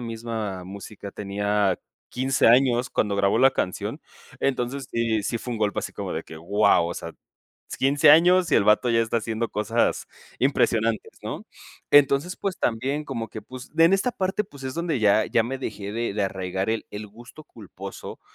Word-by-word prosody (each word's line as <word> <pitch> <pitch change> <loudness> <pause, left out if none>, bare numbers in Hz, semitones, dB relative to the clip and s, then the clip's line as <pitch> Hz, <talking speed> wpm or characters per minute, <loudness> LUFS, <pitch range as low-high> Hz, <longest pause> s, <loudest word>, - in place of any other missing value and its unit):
misma 110 -5 -5
música 100 +1 -9
tenía 100 -1 0 0.3
15 130 +1 +1
años 125 +1 +4
cuando 100 -2 0
grabó 100 +2 +2
la 135 +2 +6
canción. 90 -7 -3 0.4
Entonces, 135 0 -1
sí, 115 -2 0
si 115 - -2
fue 125 - -6
un 115 - -4
golpe 105 -1 0
así - - -6
como - - -5
de - - -3
que, 80 - -11
guau, 85 0 +3
o 85 - -4
sea, - - -7 0.7
15 140 +2 +4
años 175 +3 +6
y - - +5
el - - +4
bato 105 +4 +3
ya 115 -1 +3
está 115 +1 0
haciendo 115 +1 -2
cosas 105 +3 0 0.3
impresionantes 115 -4 +1
¿no? - - -6 0.5
Entonces, 145 +5 +4
pues, 195 -2 -3
también 135 +6 -1
como 115 -4 -4
que, 110 - -8
pues, 130 +4 -11
en 165 +3 +6
esta 220 +6 +1
parte, 190 +1 -1
pues, 140 -7 -14
es 130 0 -4
donde 165 -5 -1
ya 105 0 +4
ya 115 - +2
me 130 +3 -4
dejé 105 -5 -5
de 115 -1 -2
de 105 -1 0
arraigar 95 +1 -2
el 115 - -2
el 105 +1 -6
gusto 120 +8 -14
culposo, 100 -5 -10
115 Hz, 185 wpm, -24 LUFS, 105-135 Hz, 0.7 s, la